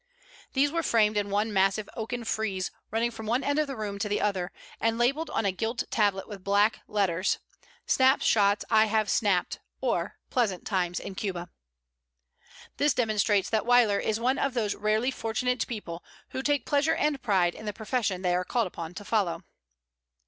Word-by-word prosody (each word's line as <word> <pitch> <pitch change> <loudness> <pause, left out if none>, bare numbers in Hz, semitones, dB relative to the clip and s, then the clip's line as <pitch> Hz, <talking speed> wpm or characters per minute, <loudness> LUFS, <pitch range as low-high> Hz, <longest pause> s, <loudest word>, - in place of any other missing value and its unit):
These 280 +1 +3
were 335 +1 0
framed 215 -7 +3
in 205 -1 0
one 210 +2 0
massive 195 +2 +2
oaken 235 +2 -4
frieze 215 -4 -2 0.2
running 230 +2 0
from 220 -1 -8
one 240 +4 +1
end 285 +1 +1
of 305 - +1
the 275 - -5
room 205 -3 -4
to 210 - -1
the 205 - 0
other, 190 -4 -1 0.3
and 225 0 +1
labelled 275 +7 +1
on 225 - -1
a 195 - +3
gilt 225 +5 -2
tablet 200 -3 +1
with 200 -3 -9
black 205 +3 +3
letters, 190 -3 +1 0.5
"Snap 260 +1 +4
Shots 205 -1 +3
I 220 -1 +6
Have 215 -1 +1
Snapped, 195 -5 +1 0.2
or - - -1
Pleasant 215 -8 0
Times 180 -3 0
in - - -7
Cuba." 180 -3 -4 1.3
This 290 0 +2
demonstrates 210 -4 +1
that 220 -1 +2
Weyler 240 -5 +5
is 220 0 -1
one 255 +3 +1
of 275 -2 0
those 215 -4 0
rarely 215 +5 +1
fortunate 250 +1 -1
people 180 -7 -6 0.3
who 260 - -4
take 290 +1 0
pleasure 290 +2 +2
and 295 -3 0
pride 185 -6 +2
in 215 - -9
the - - 0
profession 215 -3 -2
they 180 -1 +2
are 180 +1 +1
called 235 +4 0
upon 170 -2 -7
to 205 - -8
follow. 190 -6 0
215 Hz, 185 wpm, -28 LUFS, 195-240 Hz, 1.3 s, I